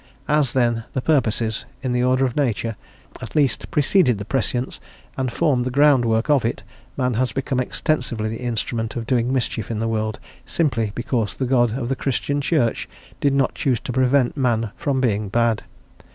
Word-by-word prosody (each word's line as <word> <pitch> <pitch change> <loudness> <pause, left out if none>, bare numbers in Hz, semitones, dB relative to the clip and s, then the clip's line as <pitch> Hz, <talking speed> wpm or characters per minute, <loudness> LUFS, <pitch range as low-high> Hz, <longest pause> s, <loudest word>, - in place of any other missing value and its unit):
As, 150 -4 +2
then, 120 -3 +1
the 130 - -1
purposes, 115 -7 +1 0.2
in 130 - -1
the 125 0 +1
order 130 +1 +3
of 125 - -2
nature, 115 -5 0 0.5
at - - -8
least 140 -6 +1
preceded 145 - +3
the 100 - -6
prescience 125 +1 -2 0.4
and 130 -2 -1
formed 135 -4 +1
the 130 - -2
groundwork 125 -5 +3
of 145 -4 +3
it, 115 -2 -2 0.3
man 125 -2 +1
has 125 +1 0
become 135 +1 -1
extensively 125 -4 -1
the 110 +2 -5
instrument 115 -1 -2
of 115 - -3
doing 125 0 +1
mischief 120 -5 -1
in 115 - -2
the 115 +1 -1
world 110 -1 -2 0.2
simply 120 -10 0
because 120 -3 -2
the 130 - -1
God 120 -2 +2
of 125 -3 -3
the 135 - 0
Christian 140 +2 -1
Church 140 -6 0 0.3
did 140 -1 +2
not 135 -1 +2
choose 125 -5 0
to 125 - -5
prevent 130 0 +2
man 115 -6 0
from 140 -4 -1
being 105 -5 0
bad. 115 0 +1
125 Hz, 180 wpm, -22 LUFS, 115-135 Hz, 0.5 s, order